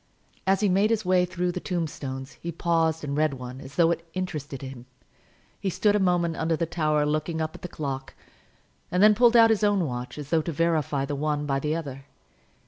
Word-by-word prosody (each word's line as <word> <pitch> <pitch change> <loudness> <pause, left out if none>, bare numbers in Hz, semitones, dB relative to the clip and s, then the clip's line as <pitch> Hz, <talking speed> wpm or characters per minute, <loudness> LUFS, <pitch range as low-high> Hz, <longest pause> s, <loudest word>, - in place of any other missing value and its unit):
As 195 +1 +3
he 210 - +3
made 195 +3 +3
his 220 -3 0
way 180 0 +4
through 180 0 -2
the 180 - -4
tombstones 145 -7 -4
he 170 - -4
paused 165 -2 +1
and 140 -1 -3
read 150 -2 +1
one, 130 +1 -8
as 135 +1 -11
though 170 -1 +4
it 165 - -2
interested 150 -7 -4
him. 130 -2 -9 0.7
He 195 - -1
stood 205 +3 +2
a - - +3
moment 175 -3 +1
under 160 0 +1
the 170 - -1
tower 155 -3 +1
looking 155 +2 -1
up 155 0 -2
at - - -12
the - - -5
clock, 135 -5 -5 0.7
and 180 +2 +2
then 215 0 +8
pulled 240 +2 +4
out 225 -1 +7
his 220 -1 +1
own 205 -4 +3
watch, 125 -1 -5
as 145 -1 -8
though 165 -1 +4
to 165 - -4
verify 155 -3 0
the 145 - -4
one 150 +1 -1
by 135 -1 0
the 150 +3 -1
other. 135 -4 -6
160 Hz, 220 wpm, -26 LUFS, 145-180 Hz, 0.7 s, then